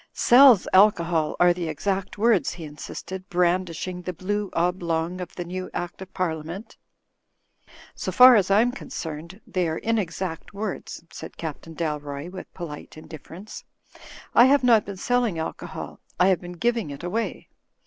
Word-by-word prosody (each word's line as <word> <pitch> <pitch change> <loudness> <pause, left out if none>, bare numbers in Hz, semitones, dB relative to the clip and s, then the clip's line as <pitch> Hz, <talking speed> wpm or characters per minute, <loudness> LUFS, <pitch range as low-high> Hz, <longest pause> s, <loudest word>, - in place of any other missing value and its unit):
"Sells 245 -4 +6
alcohol, 170 -5 +4
are 175 0 +6
the 175 -1 -4
exact 190 +6 -2
words," 220 -3 +2
he 175 - -9
insisted, 170 +5 -8
brandishing 180 0 0
the 180 - -4
blue 200 +4 -2
oblong 170 0 -1
of 180 - -8
the 175 - -5
new 185 +1 -5
Act 175 +1 -5
of 190 0 -9
Par 185 -3 -1
liament. 165 +7 -7 1.2
"So - - -4
far 250 0 +9
as 200 -3 +3
I 200 +2 +5
am 245 +1 +2
concerned 170 - -7
they 180 -2 -1
are 160 - -2
inexact 190 -5 -3
words," 200 -4 -5
said 160 - -9
Captain 160 0 -7
Dalroy, 150 -1 -4
with 185 - -9
polite 155 -4 -8
indifference. 165 +6 -10 0.7
"I 240 - +8
have 275 0 +4
not 230 -4 +5
been 200 -1 -7
selling 240 -3 0
alcohol, 160 - -6 0.2
I 180 +1 +5
have 185 - +2
been 175 0 -8
giving 230 -1 -1
it 140 +3 -8
away. 220 +6 -3
180 Hz, 160 wpm, -24 LUFS, 165-205 Hz, 1.2 s, far